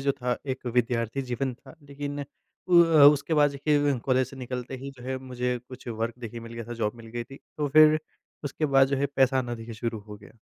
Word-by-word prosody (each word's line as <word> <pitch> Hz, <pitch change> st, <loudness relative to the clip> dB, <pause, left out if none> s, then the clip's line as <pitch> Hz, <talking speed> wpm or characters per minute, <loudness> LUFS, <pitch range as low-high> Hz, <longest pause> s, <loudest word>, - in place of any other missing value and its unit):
जो 140 Hz, 0 st, +1 dB
था 125 Hz, -1 st, -2 dB
एक 130 Hz, -1 st, -4 dB
विद्यार्थी 120 Hz, +1 st, 0 dB
जीवन 130 Hz, +1 st, -1 dB
था। 130 Hz, +4 st, -16 dB
लेकिन 145 Hz, 0 st, -5 dB
उ -, -, -4 dB, 1.0 s
उसके 165 Hz, -, 0 dB
बाद 145 Hz, -1 st, +4 dB
देखिए 145 Hz, +1 st, +1 dB
कॉलेज 130 Hz, -1 st, +2 dB
से 135 Hz, -, -12 dB
निकलते 125 Hz, 0 st, -5 dB
ही 135 Hz, +2 st, -7 dB
जो 125 Hz, -, -13 dB
है 130 Hz, +1 st, -3 dB
मुझे 125 Hz, -1 st, -2 dB
कुछ 130 Hz, -1 st, -11 dB
वर्क 115 Hz, 0 st, -3 dB
देखिये 115 Hz, -1 st, -7 dB
मिल 115 Hz, 0 st, -10 dB
गया 115 Hz, 0 st, -6 dB
था, 120 Hz, -, -7 dB
जॉब 110 Hz, -2 st, -1 dB
मिल 115 Hz, -, -12 dB
गई 120 Hz, +1 st, -5 dB
थी। 135 Hz, -, -12 dB, 0.2 s
तो 145 Hz, -1 st, 0 dB
फिर 155 Hz, +2 st, +7 dB, 0.5 s
उसके 155 Hz, +2 st, -1 dB
बाद 135 Hz, -1 st, +5 dB
जो 140 Hz, -, 0 dB
है 140 Hz, +1 st, +1 dB
पैसा 130 Hz, 0 st, +4 dB
आना 120 Hz, -2 st, -2 dB
देखिए 115 Hz, 0 st, -8 dB
शुरू 115 Hz, 0 st, -3 dB
हो 105 Hz, -1 st, -9 dB
गया। 100 Hz, 0 st, -16 dB
130 Hz, 230 wpm, -27 LUFS, 120-140 Hz, 1.0 s, फिर